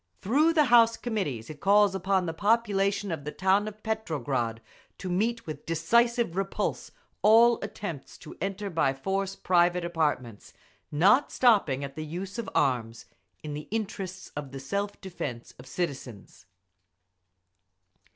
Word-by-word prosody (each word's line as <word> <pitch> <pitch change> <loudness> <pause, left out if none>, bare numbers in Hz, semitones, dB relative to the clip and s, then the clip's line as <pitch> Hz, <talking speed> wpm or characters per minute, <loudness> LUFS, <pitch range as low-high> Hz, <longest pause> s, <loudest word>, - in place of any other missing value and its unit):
Through 295 - +3
the 310 -2 +5
House 230 -1 +6
Committees 185 - -3
it 150 - -11
calls 200 +1 +4
upon 190 0 0
the 165 - -3
population 200 0 +1
of 160 -3 -4
the 150 - -5
town 190 +4 +2
of 215 0 -9
Petrograd 140 - -2 0.4
to 185 - -6
meet 230 +6 0
with 150 -2 -8
decisive 235 +5 +2
repulse 195 0 -2 0.3
all 230 +2 +6
attempts 165 -9 -7
to 155 - -11
enter 195 +1 -3
by 135 -5 +1
force 195 +6 -2
private 175 -1 +2
apartments, 150 -10 -2 0.4
not 200 - +4
stopping 195 - +3
at 140 -1 -7
the 155 - -5
use 185 +8 -6
of 230 - -4
arms, 115 -4 0 0.4
in 150 -1 -5
the 150 +1 -7
interests 195 -4 -5
of 145 -2 -6
the 135 - -6
self 200 +9 -3
defence 145 -11 -6
of 125 - -12
citizens. 135 - -6
185 Hz, 140 wpm, -28 LUFS, 150-210 Hz, 0.4 s, House